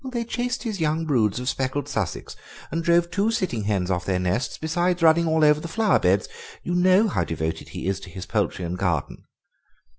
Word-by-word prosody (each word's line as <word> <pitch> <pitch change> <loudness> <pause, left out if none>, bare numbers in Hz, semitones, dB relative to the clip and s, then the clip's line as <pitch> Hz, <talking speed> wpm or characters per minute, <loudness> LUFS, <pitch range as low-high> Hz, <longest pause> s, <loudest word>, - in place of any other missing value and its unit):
"They 235 -2 -2
chased 245 +2 -2
his 215 -5 -3
young 160 +1 0
broods 120 -8 +1
of 125 - -5
speckled 135 +1 -1
Sussex 110 - -3 0.4
and 165 +2 -2
drove 170 0 +3
two 205 +3 +1
sitting 185 - -1
hens 95 -3 0
off 90 -1 -1
their 95 0 0
nests, 90 +8 -1
besides 175 +2 0
running 165 +1 +5
all 160 -1 +3
over 150 0 +5
the 170 - -6
flower 215 +4 +2
beds. 95 +1 +2 0.4
You 175 - -2
know 185 +4 +4
how - - 0
devoted 80 0 -4
he - - -6
is 95 +1 -1
to - - -11
his 90 +1 -8
poultry 90 - -1
and 90 +2 -4
garden." 85 -7 -2
150 Hz, 205 wpm, -24 LUFS, -, 0.4 s, running